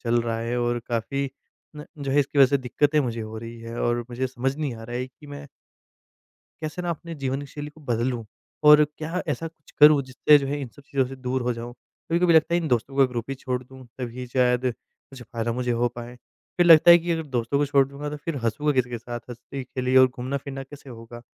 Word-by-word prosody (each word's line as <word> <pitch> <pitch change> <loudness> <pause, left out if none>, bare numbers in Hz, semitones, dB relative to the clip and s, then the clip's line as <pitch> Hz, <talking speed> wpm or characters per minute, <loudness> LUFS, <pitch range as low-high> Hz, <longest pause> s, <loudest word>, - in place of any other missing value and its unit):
चल 120 0 +2
रहा 115 -1 -2
है 115 +1 -2
और 120 0 0
काफ़ी 130 +4 -2 0.5
न 150 - -8
जो 140 -1 -3
है, 145 - +4
इसकी 145 +1 -2
वजह 135 - +9
से 140 +2 +1
दिक्कतें 145 +4 +1
मुझे 120 -4 -2
हो 110 0 -6
रही 115 +1 -8
हैं 115 0 -7
और 120 0 +1
मुझे 125 +2 -2
समझ 130 +2 -2
नहीं 145 -6 -3
आ 115 - -10
रहा 120 +1 -5
है 125 +1 -2
कि 145 +3 -17
मैं 145 0 -9 1.2
कैसे 155 +3 -4
ना 175 - -2
अपने 170 +1 -6
जीवन 135 -1 -3
शैली 150 0 -7
को 155 +1 -19
बदलूँ 120 -2 -1 0.4
और 150 0 +9
क्या 165 +4 -3
ऐसा 165 +2 -2
कुछ 155 -2 -23
करूँ, 150 -1 +8
जिससे 130 +3 +4
जो 140 - -3
है, 145 +1 -2
इन 130 - -5
सब 145 - -18
चीज़ों 140 -1 0
से 135 +1 -8
दूर 130 0 -2
हो 125 - 0
जाऊँ? 120 +1 -7
कभी-कभी 170 +7 -1
लगता 160 +1 +4
है, 175 - +3
इन 160 - -3
दोस्तों 125 +3 -1
का 135 - +6
ग्रुप 120 +1 -5
ही - - -2
छोड़ 130 -1 -3
दूँ, 130 0 -14
तभी 125 0 -5
शायद 125 0 +1
कुछ 135 -2 -17
फ़ायदा 115 0 -3
मुझे 125 +1 -2
हो 120 +1 +1
पाए। 120 +1 -9 0.4
फिर 175 -1 +4
लगता 165 0 +8
है 170 - +10
कि, 170 +1 -4
"अगर 165 - -1
दोस्तों 120 +3 0
को 145 - +2
छोड़ 140 -1 +3
दूँगा, 145 +1 -6
तो 150 - -5
फिर 165 -4 -2
हँसूँगा 145 +7 +1
किस 130 -3 +2
के 120 -1 -5
साथ? 120 +1 -6
हँसी 125 +3 -7
खेली 130 +1 -1
और 130 0 +8
घूमना-फिरना 135 +2 -5
कैसे 140 0 -12
होगा? 120 0 -11
130 Hz, 240 wpm, -25 LUFS, 120-145 Hz, 1.2 s, है